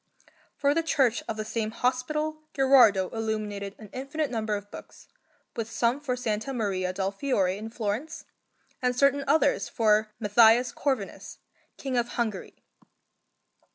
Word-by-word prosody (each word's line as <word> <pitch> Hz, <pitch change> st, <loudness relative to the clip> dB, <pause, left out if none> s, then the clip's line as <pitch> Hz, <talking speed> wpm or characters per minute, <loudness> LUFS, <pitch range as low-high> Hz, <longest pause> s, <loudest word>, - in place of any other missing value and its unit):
For 285 Hz, 0 st, +2 dB
the 330 Hz, -, +1 dB
church 270 Hz, -8 st, +2 dB
of 220 Hz, -, -4 dB
the 215 Hz, -, -3 dB
same 220 Hz, 0 st, -2 dB
hospital 300 Hz, +7 st, -1 dB
Gherardo 255 Hz, -9 st, +5 dB
illuminated 215 Hz, -3 st, -3 dB
an 215 Hz, -3 st, -13 dB
infinite 275 Hz, +3 st, -3 dB
number 220 Hz, -3 st, -1 dB
of 205 Hz, 0 st, -8 dB
books, -, -, -12 dB, 0.5 s
with 225 Hz, -1 st, -3 dB
some 235 Hz, +4 st, 0 dB
for 275 Hz, -4 st, -2 dB
S. 225 Hz, -2 st, -2 dB
Maria 200 Hz, -8 st, -1 dB
del 190 Hz, +1 st, -2 dB
Fiore 195 Hz, -5 st, 0 dB
in 215 Hz, +2 st, -7 dB
Florence, 230 Hz, +7 st, -4 dB, 0.6 s
and 250 Hz, -1 st, +1 dB
certain 280 Hz, +2 st, +3 dB
others 290 Hz, 0 st, +2 dB
for 215 Hz, -1 st, +2 dB
Matthias 230 Hz, +3 st, +5 dB
Corvinus, 260 Hz, -7 st, -3 dB, 0.4 s
King 265 Hz, -2 st, -3 dB
of 240 Hz, -1 st, +1 dB
Hungary. 220 Hz, -5 st, -4 dB
230 Hz, 140 wpm, -27 LUFS, 210-270 Hz, 0.6 s, Gherardo